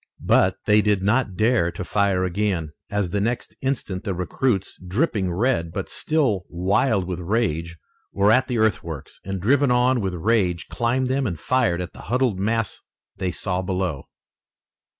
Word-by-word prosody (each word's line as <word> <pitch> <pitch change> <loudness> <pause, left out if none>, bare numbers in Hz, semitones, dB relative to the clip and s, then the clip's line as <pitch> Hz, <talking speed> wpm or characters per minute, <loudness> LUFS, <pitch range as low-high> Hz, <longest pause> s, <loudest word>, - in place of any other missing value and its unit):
But 95 0 +4
they 105 0 +5
did 105 -2 +1
not 105 -1 +1
dare 110 -6 +2
to - - -5
fire 95 +1 +1
again, 90 -4 -1 0.2
as 100 -4 -1
the 100 - 0
next 120 +3 -2
instant 120 -8 -2
the 100 -4 -2
recruits, 95 +3 -1
dripping 100 - 0
red, 95 -3 0
but - - -4
still 130 - 0
wild 95 +3 +1
with 90 -1 -4
rage, 85 -4 -1 0.3
were 100 +2 +3
at 130 +3 +4
the 125 -3 -1
earthworks, 85 -9 -1
and 95 0 -4
driven 140 +8 +3
on 125 0 +3
with 95 -2 -2
rage 90 -2 0
climbed 125 +2 0
them 130 0 0
and 85 -6 -4
fired 115 -8 +1
at 90 - -6
the - - -11
huddled 125 -5 +1
mass 110 +2 -1 0.4
they 95 -1 -1
saw 90 +1 -2
below. 90 -6 -2
100 Hz, 165 wpm, -23 LUFS, 90-120 Hz, 0.4 s, they